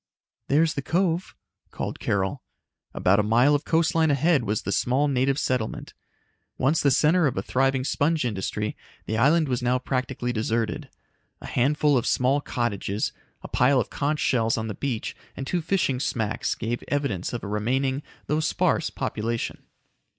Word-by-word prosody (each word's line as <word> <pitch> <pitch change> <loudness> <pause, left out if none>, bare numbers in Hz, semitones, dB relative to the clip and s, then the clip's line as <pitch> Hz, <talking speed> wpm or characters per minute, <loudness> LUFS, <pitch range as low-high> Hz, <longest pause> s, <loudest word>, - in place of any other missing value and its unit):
"There's 155 +3 +3
the 140 - -3
cove," 175 +3 0 0.3
called - - -5
Carol. 95 -1 -1 0.5
About 95 +3 +2
a 105 0 0
mile 125 +6 +5
of 145 0 0
coastline 165 -1 +2
ahead 145 -1 +2
was 105 0 -1
the - - -2
small 130 +8 +2
native 135 0 +1
settlement. 125 -6 -2 0.6
Once 150 +5 +2
the 140 - +4
center 155 +5 +4
of 130 - -2
a 95 - -1
thriving 135 +2 +1
sponge 150 +2 +1
industry, 105 -1 -2 0.3
the 110 - -2
island 155 +5 +4
was 125 -2 -1
now 125 +1 +2
practically 125 -1 -2
deserted. 115 0 -1 0.5
A - - -11
handful 145 +1 +2
of - - -4
small 135 +3 +2
cottages, 110 -5 -2 0.3
a - - -6
pile 130 +2 +3
of 120 - -2
conch 150 +2 0
shells 115 -3 +1
on 110 0 -2
the 110 - -3
beach 125 -1 -3 0.2
and 135 - -4
two 175 +5 -1
fishing 160 -7 0
smacks 110 -4 -1
gave 120 +1 -3
evidence 140 -11 -1
of 120 - -5
a - - -4
remaining, 130 +6 0 0.2
though 150 - 0
sparse, 165 +1 +1
population. 115 +1 -3
130 Hz, 165 wpm, -25 LUFS, 115-150 Hz, 0.6 s, mile